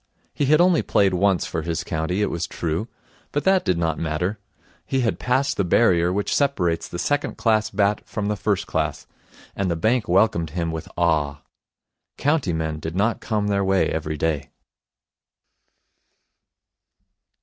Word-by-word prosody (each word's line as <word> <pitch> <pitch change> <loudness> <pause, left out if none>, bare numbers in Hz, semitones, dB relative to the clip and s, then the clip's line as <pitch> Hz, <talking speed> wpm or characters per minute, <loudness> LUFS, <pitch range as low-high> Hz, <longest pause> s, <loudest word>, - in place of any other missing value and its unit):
He 145 - 0
had 150 +3 +4
only 175 -1 +4
played 95 -2 +2
once 95 0 +2
for 80 - -3
his 85 0 -3
county, 80 +5 -1
it - - -1
was 85 0 -2
true, 85 +6 -3 0.4
but 145 - -1
that 190 -1 +3
did 90 - +1
not 80 -1 -1
matter. 85 +6 -2 0.4
He 135 - -1
had 115 - 0
passed 130 +2 0
the 100 - +2
barrier 90 -2 +3
which 100 +2 -1
separates 95 - +1
the - - -6
second 145 +10 -1
class 110 -2 +2
bat 105 0 +1
from 105 -1 -3
the 105 - 0
first 95 - -1
class, - - -2 0.5
and 100 -2 -1
the 85 - 0
bank 110 +8 +1
welcomed 90 -3 +2
him 85 -1 -1
with 80 -1 -6
awe. 75 -5 +1 0.7
County 145 - +1
men 80 -1 -2
did 80 +2 -5
not 105 +5 +1
come 105 -2 -1
their 100 -1 +1
way 95 0 +2
every 80 -1 -3
day. 80 -2 -1
95 Hz, 160 wpm, -23 LUFS, 80-110 Hz, 0.7 s, had